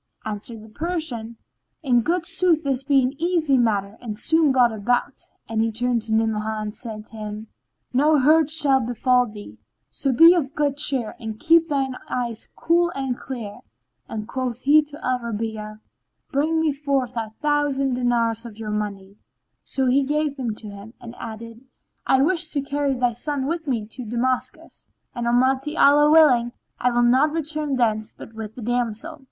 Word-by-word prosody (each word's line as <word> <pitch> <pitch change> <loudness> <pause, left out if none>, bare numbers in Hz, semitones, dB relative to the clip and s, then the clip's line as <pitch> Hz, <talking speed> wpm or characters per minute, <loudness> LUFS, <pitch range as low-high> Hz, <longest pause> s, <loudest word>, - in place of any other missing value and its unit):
Answered 215 +1 -6
the 220 - -14
Persian, 255 -6 -4 0.5
"In 245 -4 +3
good 340 +7 -1
sooth 350 -3 +3
this 270 -2 -1
be 275 -1 +3
an 255 +2 -1
easy 335 -5 +2
matter 210 -4 0
and 220 -3 -6
soon 320 0 +3
brought 250 -3 +4
about," 240 +3 0 0.3
and 225 -1 -1
he 225 0 +1
turned 240 +1 0
to 220 0 -3
Ni'amah 220 -1 0
and 210 -1 -4
said 215 -2 -8
to 225 - -13
him, 215 0 -7 0.4
"No 300 +4 +4
hurt 305 +2 +4
shall 295 -4 +4
befall 250 +1 +1
thee; 205 - -11 0.3
so 275 - -1
be 330 +7 +8
of 290 -6 -2
good 285 -2 0
cheer 265 -6 +1
and 220 -1 -6
keep 330 0 +4
thine 270 -3 -1
eyes 235 -3 -4
cool 345 +1 +2
and 265 -2 -2
clear." 230 -6 -7 0.5
Then 215 -1 -5
quoth 255 0 -4
he 295 +3 +5
to 295 +1 -10
Al 255 0 +1
Rabi'a, 220 -2 -5 0.5
"Bring 310 +3 +1
me 320 -1 +2
out 285 - -2
four 275 -2 +1
thousand 270 +4 -1
dinars 235 -2 0
of 230 -3 -10
your 220 -1 -5
money;" 200 -2 -5 0.4
so 265 - -1
he 260 +2 +3
gave 295 +1 -1
them 240 -6 -3
to 215 - -10
him, 205 +3 -11
and 235 0 -10
he - - -16
added, 230 +1 -8 0.5
"I 265 0 +4
wish 340 +1 +3
to 285 - 0
carry 280 -1 -1
thy 245 -1 +1
son 275 +3 -3
with 325 +1 -3
me 235 -6 -1
to 250 +3 -7
Damascus; 245 +3 -3 0.3
and 240 -1 -3
Almighty 265 +5 +1
Allah 295 +1 +6
willing, 255 -7 +5 0.3
I 250 - +2
will 240 0 +2
not 260 +6 +3
return 305 -3 -2
thence 220 -3 0
but 225 - -11
with 220 -1 -8
the 245 - -8
damsel." 245 +6 -2
250 Hz, 180 wpm, -23 LUFS, 225-290 Hz, 0.5 s, be